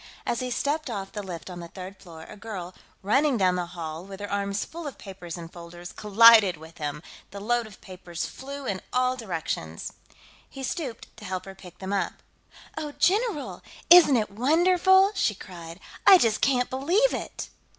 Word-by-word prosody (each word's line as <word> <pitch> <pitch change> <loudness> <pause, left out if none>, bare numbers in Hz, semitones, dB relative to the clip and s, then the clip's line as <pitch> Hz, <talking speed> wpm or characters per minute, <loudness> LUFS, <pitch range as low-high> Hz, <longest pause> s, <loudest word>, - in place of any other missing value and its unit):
As 235 - -1
he 255 - -3
stepped 290 +4 -1
off 195 -4 -5
the 210 - -5
lift 180 -4 -7
on 180 -2 -7
the 170 - -7
third 185 +2 -9
floor, 165 -3 -11
a - - -11
girl, 195 -4 -7 0.3
running 270 +6 +3
down 185 -3 +3
the 180 -1 -2
hall 165 -1 -6
with 195 0 -10
her 205 0 -6
arms 200 0 -1
full 335 -1 -7
of 275 - -7
papers 185 -4 -8
in 170 -1 -7
folders, 175 +1 -10
collided 210 -3 +6
with 160 +2 -14
him; 150 +1 -4 0.3
the 200 - -8
load 235 +2 0
of 210 - -15
papers 180 -3 -6
flew 280 +1 -8
in 195 -5 -2
all 255 0 +2
directions. 165 - -4 0.6
He 270 - -8
stooped 265 -4 -5
to - - -12
help 185 -1 -4
her 195 - -9
pick 180 -2 -14
them 190 +1 -5
up. 200 - 0 0.6
"Oh, 300 -2 -5
general! 370 - 0 0.3
Isn't 340 -7 +9
it 215 -3 -1
wonderful?" 360 - +4
she 215 - +1
cried. 170 -2 -10 0.3
"I 385 - +11
just 225 -9 +1
can't 250 -3 +2
believe 345 - +2
it!" - - -5
205 Hz, 185 wpm, -26 LUFS, 180-270 Hz, 0.6 s, I